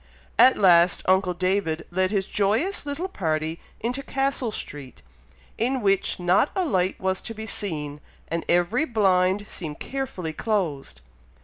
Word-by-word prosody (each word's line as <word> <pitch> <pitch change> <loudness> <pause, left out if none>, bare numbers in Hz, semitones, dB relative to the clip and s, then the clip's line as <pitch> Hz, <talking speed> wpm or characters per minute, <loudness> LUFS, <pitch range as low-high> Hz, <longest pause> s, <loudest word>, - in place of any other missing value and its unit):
At 260 - +7
last 175 -3 +5
uncle 185 -1 +2
David 185 -3 0
led 185 +1 +1
his 195 -2 0
joyous 225 - 0
little 295 +6 -3
party 160 - -2 0.2
into 245 +4 -2
Castle 270 -3 -1
Street, 145 - -7 0.6
in 255 +3 +1
which 195 -4 +1
not 180 +10 +3
a 375 - +1
light 185 - 0
was 190 0 -1
to 225 - -5
be 220 +1 -6
seen, 150 -9 -4 0.3
and 165 +1 -2
every 175 - +2
blind 195 -4 +2
seemed 155 -3 -6
carefully 235 -12 -4
closed. 155 - -2
190 Hz, 140 wpm, -25 LUFS, 170-230 Hz, 0.6 s, At